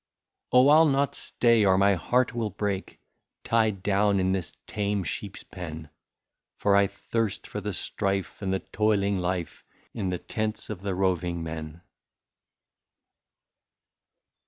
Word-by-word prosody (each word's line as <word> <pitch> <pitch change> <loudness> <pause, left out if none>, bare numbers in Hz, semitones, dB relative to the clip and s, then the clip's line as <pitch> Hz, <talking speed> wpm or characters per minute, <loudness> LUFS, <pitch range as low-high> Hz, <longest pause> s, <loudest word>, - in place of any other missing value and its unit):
Oh! 125 +3 +6
I 150 - +8
'11 160 -3 +5
not 140 +1 +1
stay, 115 -3 +2
or 95 -2 +4
my 100 +1 +5
heart 125 +8 +1
will 115 -2 -1
break, 100 0 -3 0.4
Tied 110 -4 +1
down 100 0 +2
in 95 0 +1
this 95 -3 -2
tame 100 -2 -1
sheep's 100 +4 -5
pen, 80 -4 -8 0.7
For 100 -1 +3
I 100 0 +5
thirst 105 +1 -3
for 105 - -5
the 105 +1 -3
strife 95 +1 -2
and 95 -2 -1
the 95 - 0
toiling 100 -2 +1
life, 90 -2 -3 0.3
In 100 -5 -2
the 90 - -1
tents 110 +2 -3
of 95 -4 -6
the 100 -2 -2
roving 90 -2 0
men. 80 0 -6
100 Hz, 140 wpm, -27 LUFS, 95-110 Hz, 0.7 s, I